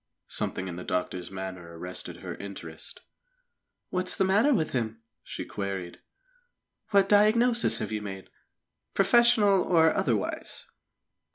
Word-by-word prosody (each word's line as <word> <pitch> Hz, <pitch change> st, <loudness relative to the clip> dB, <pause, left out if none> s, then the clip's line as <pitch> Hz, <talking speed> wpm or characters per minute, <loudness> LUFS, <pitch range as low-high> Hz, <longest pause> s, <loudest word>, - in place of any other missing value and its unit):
Something 95 Hz, -, -3 dB
in 85 Hz, -2 st, -6 dB
the 90 Hz, -, -6 dB
doctor's 90 Hz, 0 st, -3 dB
manner 95 Hz, -3 st, -7 dB
arrested 90 Hz, +2 st, -6 dB
her -, -, -5 dB
interest. 85 Hz, -5 st, -9 dB, 0.9 s
"What 185 Hz, 0 st, -1 dB
is -, -, +1 dB
the -, -, +3 dB
matter 205 Hz, +9 st, +4 dB
with 170 Hz, -, +1 dB
him?" 115 Hz, -3 st, -3 dB, 0.2 s
she -, -, -7 dB
queried. 95 Hz, -3 st, -5 dB, 0.9 s
"What 200 Hz, -2 st, +4 dB
diagnosis 230 Hz, +4 st, +4 dB
have -, -, -4 dB
you 105 Hz, -1 st, -2 dB
made, 95 Hz, -2 st, -8 dB, 0.6 s
professional 205 Hz, -1 st, +5 dB
or 160 Hz, -3 st, +4 dB
otherwise?" 115 Hz, -8 st, -2 dB
115 Hz, 125 wpm, -28 LUFS, -, 0.9 s, professional